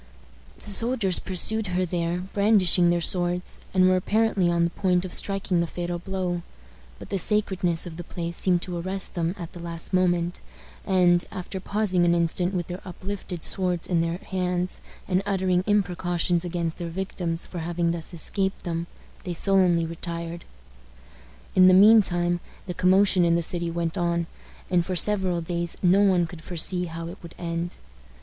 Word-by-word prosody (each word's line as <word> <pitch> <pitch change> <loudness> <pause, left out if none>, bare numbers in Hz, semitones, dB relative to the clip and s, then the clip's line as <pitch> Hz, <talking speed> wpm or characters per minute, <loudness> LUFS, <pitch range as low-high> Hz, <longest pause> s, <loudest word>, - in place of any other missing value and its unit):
The 205 - -8
soldiers 225 -3 +1
pursued 210 +3 +1
her 185 0 0
there, 175 0 -2
brandishing 195 -4 +4
their 175 0 +1
swords, 175 +1 0
and 185 -1 +4
were 185 - +4
apparently 205 -1 +1
on 170 0 +2
the 170 - 0
point 180 -1 +1
of 180 - -6
striking 195 -3 -1
the 170 - 0
fatal 175 +1 -4
blow; 180 -1 -3 0.6
but - - -11
the 195 - 0
sacredness 185 -4 +1
of 165 -2 -8
the 175 - -6
place 170 0 -4
seemed 180 -1 +1
to 175 -2 -4
arrest 190 +2 -2
them 170 +1 -1
at 170 -2 -8
the 175 - -9
last 170 +1 -3
moment, 175 -1 +1 0.5
and, 180 -2 +4
after 190 +1 -5
pausing 195 -2 +1
an 170 0 +3
instant 170 +2 0
with 175 -2 -1
their 180 +2 -7
uplifted 185 -1 -6
swords 180 -3 -1
in 170 -2 +1
their 165 +1 -1
hands, 180 -2 -2 0.3
and 185 0 +1
uttering 190 -2 +1
imprecations 175 -3 +1
against 170 -1 -2
their 170 -1 -4
victims 175 -2 -3
for 180 - -7
having 170 +1 -1
thus 165 -2 -5
escaped 190 +3 0
them, 170 0 -3 0.4
they 175 -2 -4
sullenly 180 -2 +3
retired. 170 0 -6 1.1
In 185 0 +6
the 185 - +7
mean 215 +3 +8
time 175 -2 -1 0.3
the 180 - -4
commotion 185 +1 +4
in 170 0 +3
the 170 - +1
city 170 0 +1
went 170 +2 -2
on, 170 -1 0 0.4
and 180 -2 +2
for 185 +1 -3
several 185 -2 +3
days 170 0 -2
no 185 +3 +5
one 185 -4 +3
could 165 0 -10
foresee 180 +2 -1
how 165 0 -6
it 175 +4 -9
would 170 -2 -12
end. 170 0 -4
180 Hz, 175 wpm, -25 LUFS, 170-190 Hz, 1.1 s, mean